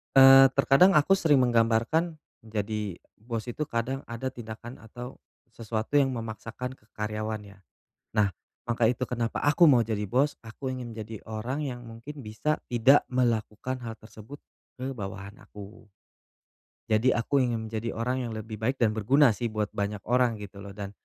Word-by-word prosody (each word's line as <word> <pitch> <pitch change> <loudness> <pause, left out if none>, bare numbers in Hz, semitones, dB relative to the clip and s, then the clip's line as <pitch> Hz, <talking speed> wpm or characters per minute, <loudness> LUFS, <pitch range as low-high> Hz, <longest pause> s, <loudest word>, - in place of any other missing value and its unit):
Eee, 135 0 +9
terkadang 140 +7 +5
aku 170 +4 +5
sering 155 -7 +3
menggambarkan, 120 +7 +2 0.2
jadi 105 -3 -3 0.2
bos 115 +1 -5
itu 125 +5 -3
kadang 130 +1 -3
ada 115 +3 -5
tindakan 120 -1 -8
atau 120 +3 -9 0.4
sesuatu 110 +3 -3
yang 135 -2 +4
memaksakan 115 +2 -6
ke 105 - -31
karyawannya. 105 -2 -5 0.5
Nah, 105 -3 +3 0.3
maka 120 -1 0
itu 125 +1 0
kenapa 120 -2 -3
aku 150 +3 +6
mau 120 -4 +5
jadi 105 -2 -3
bos, 135 +6 +1
aku 130 +3 -6
ingin 120 -3 -7
menjadi 110 0 -7
orang 115 +6 -3
yang 125 -5 -5
mungkin 115 +4 -10
bisa 110 +9 -1 0.2
tidak 125 +4 +5
melakukan 120 0 0
hal 110 -1 -7
tersebut 110 +6 -12 0.4
ke 135 0 -4
bawahan 100 -1 -7
aku. 105 +1 -12 1.1
Jadi 115 +4 +3
aku 120 +4 +1
ingin 120 -3 0
menjadi 115 +1 -3
orang 125 +2 -1
yang 110 - -6
lebih 110 -1 -7
baik 125 +5 0
dan 115 -5 +2
berguna 125 +5 +4
sih 115 +3 -2
buat 110 -1 -2
banyak 100 -1 -3
orang 125 -1 +2
gitu 105 -1 -10
loh, 100 0 -9
dan 100 -1 -6
115 Hz, 160 wpm, -27 LUFS, 110-130 Hz, 1.1 s, Eee